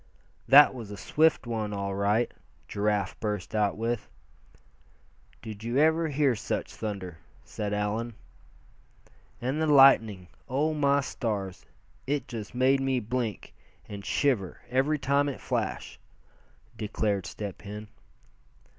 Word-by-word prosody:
"That 145 +1 +8
was 115 -5 -8
a 105 - -7
swift 155 +8 +2
one, 110 -3 -3
all 100 -1 -3
right!" 105 +4 +1 0.4
Giraffe 105 -1 -1
burst 105 -2 -3
out 105 -2 +1
with. 115 - -2 1.3
"Did 110 -2 -8
you 120 +3 -1
ever 160 +2 +4
hear 140 -3 +2
such - - -3
thunder?" 95 -6 -5 0.2
said 105 -1 -4
Allan. 105 +3 -2 1.2
"And 130 +6 -1
the 160 - +2
lightning 115 -10 +5 0.2
oh! 145 +5 +1
my 140 -1 +3
stars! 100 -8 -4 0.4
it 145 +1 -1
just 115 -1 -7
made 130 +2 +4
me 135 -1 +1
blink, 115 -2 -3 0.3
and 100 -1 -7
shiver 115 - 0
every 135 +4 +2
time 140 +1 +1
it 140 - -6
flashed," - - -3 0.8
declared 105 -3 -1
Step 100 -3 -6
Hen. 105 +1 -8
115 Hz, 125 wpm, -28 LUFS, 105-135 Hz, 1.3 s, That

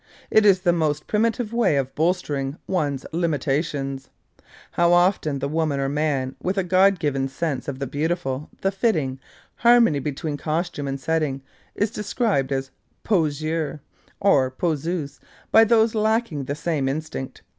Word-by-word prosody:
It 215 -1 +5
is 190 -2 +5
the 175 -2 +3
most 150 -3 0
primitive 225 +1 0
way 235 -10 +2
of 135 -1 -1
bolstering 150 -4 -1
one's 145 -7 -1
limitations. 145 -4 -1 0.6
How 170 0 +3
often 175 -5 +2
the 140 +1 -2
woman 155 -2 0
or 135 0 0
man 140 -3 -1
with 185 +2 -2
a 195 - +2
God 190 +2 +4
given 140 -4 -1
sense 135 -1 -3
of 140 -2 -4
the 140 - -3
beautiful, 150 -1 -2
the 195 - +1
fitting, 160 - 0 0.4
harmony 235 -10 +5
between 145 +2 -3
costume 155 -1 -2
and 135 0 -3
setting, 150 -3 -1 0.3
is 205 +1 0
described 210 - -1
as 135 0 -2 0.3
poseur 155 -4 0 0.4
or 145 -11 +3
poseuse 155 +1 -2 0.3
by 225 - +8
those 225 0 +3
who 220 - 0
lack 220 +2 +2
the 140 -2 -3
same 150 -3 -1
instinct. 140 -2 -5
155 Hz, 150 wpm, -23 LUFS, 140-185 Hz, 0.6 s, by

